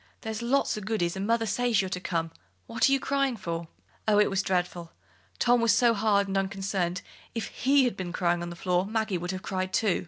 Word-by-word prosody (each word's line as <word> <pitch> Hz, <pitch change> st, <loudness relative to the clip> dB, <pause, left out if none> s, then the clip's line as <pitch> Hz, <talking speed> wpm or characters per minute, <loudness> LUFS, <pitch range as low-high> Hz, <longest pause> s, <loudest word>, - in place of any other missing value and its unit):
There's 220 Hz, 0 st, -4 dB
lots 255 Hz, +4 st, +1 dB
o' -, -, -9 dB
goodies, 195 Hz, -4 st, -1 dB
and 195 Hz, +1 st, -3 dB
mother 230 Hz, 0 st, +2 dB
says 235 Hz, 0 st, +1 dB
you're 190 Hz, -, 0 dB
to 185 Hz, -, -3 dB
come. 165 Hz, -3 st, -2 dB, 0.3 s
What 230 Hz, +3 st, +2 dB
are -, -, +1 dB
you 275 Hz, -, +4 dB
crying 275 Hz, -3 st, 0 dB
for?" 170 Hz, -3 st, -4 dB, 0.4 s
Oh, 210 Hz, -1 st, +4 dB
it 210 Hz, -, +4 dB
was 195 Hz, 0 st, +1 dB
dreadful! 180 Hz, -3 st, -2 dB, 0.4 s
Tom 245 Hz, 0 st, +3 dB
was 230 Hz, -2 st, +4 dB
so 235 Hz, 0 st, +4 dB
hard 205 Hz, -2 st, +2 dB
and 195 Hz, -, -3 dB
unconcerned; 195 Hz, -2 st, -2 dB, 0.3 s
if 225 Hz, -3 st, -3 dB
he 275 Hz, +1 st, +3 dB
had 245 Hz, -, 0 dB
been 180 Hz, -2 st, -5 dB
crying 175 Hz, -1 st, 0 dB
on 175 Hz, -, -4 dB
the 170 Hz, -, -7 dB
floor, 180 Hz, +1 st, 0 dB
Maggie 215 Hz, -4 st, -1 dB
would 175 Hz, +1 st, -5 dB
have 185 Hz, +1 st, -4 dB
cried, 185 Hz, -2 st, -2 dB
too. 205 Hz, -3 st, +2 dB
195 Hz, 225 wpm, -28 LUFS, 180-230 Hz, 0.4 s, you